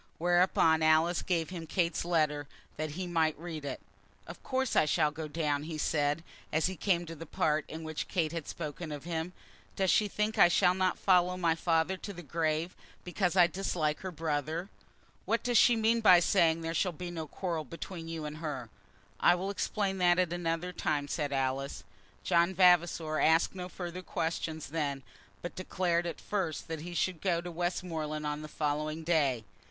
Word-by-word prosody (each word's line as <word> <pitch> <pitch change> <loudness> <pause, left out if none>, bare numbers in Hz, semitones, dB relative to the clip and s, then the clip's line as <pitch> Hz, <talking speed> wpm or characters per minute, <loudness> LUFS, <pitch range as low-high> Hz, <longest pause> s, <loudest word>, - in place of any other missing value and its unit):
Whereupon 175 -2 +3
Alice 160 +2 +4
gave 170 -2 -1
him 170 -3 -6
Kate's 170 0 0
letter, 150 -4 +1 0.3
that 155 -1 -4
he 185 - -2
might 165 -3 +1
read 160 -2 -6
it. 140 - -4 0.5
"Of 170 - -10
course 260 -1 -1
I - - +5
shall 150 0 +2
go 155 +1 -6
down," 150 -2 -1
he 160 -1 -5
said, 150 +1 0 0.3
as 155 +1 +2
he 185 - -1
came 175 -1 +1
to 165 - -7
that 165 0 -10
part 155 -1 +1
in 160 +1 -7
which 155 -1 -4
Kate 165 -5 0
had 165 -3 -5
spoken 155 0 -6
of 145 -2 -6
him. 165 0 -3 0.4
"Does 190 -2 +2
she 210 - +3
think 210 +2 -1
I - - +9
shall 180 +1 +4
not 185 0 +1
follow 180 -1 +3
my 170 -3 +2
father 165 +2 +1
to 200 +2 -7
the 175 -1 -9
grave, 160 +2 -1 0.3
because 180 0 -1
I 180 -2 +7
dislike 170 -4 -1
her 190 - -5
brother? 160 +2 -2 0.6
What 230 0 0
does 245 -2 +4
she 240 - +6
mean 225 +1 +2
by 185 -5 +8
saying 165 -2 +3
that - - -6
there 165 - -2
shall 180 +2 +1
be 175 +2 -6
no 160 -2 -5
quarrel 170 -1 -3
between 165 +3 -7
you 165 -2 -5
and 150 0 -6
her?" 140 -8 -5 0.5
"I - - +5
will 190 +3 -3
explain 195 -1 -1
that 175 -1 +4
at 180 -2 +1
another 175 0 -2
time," 150 -4 -1
said 145 -1 -2
Alice. 135 0 -2 0.4
John 175 +1 +2
Vavasor 170 -3 +4
asked 160 +1 +4
no 180 -1 -6
further 180 0 -6
questions 160 -4 -3
then, 140 -3 -2 0.4
but 175 - -5
declared 175 -2 0
at 165 - -5
first 190 -7 -3
that 160 -2 -4
he 175 +2 -7
should 175 0 -1
go 175 -3 +1
to 175 +1 -6
Westmoreland 165 -3 -3
on 150 0 -2
the 155 - -7
following 155 +1 -2
day. 145 -8 +1
165 Hz, 190 wpm, -31 LUFS, 155-180 Hz, 0.6 s, I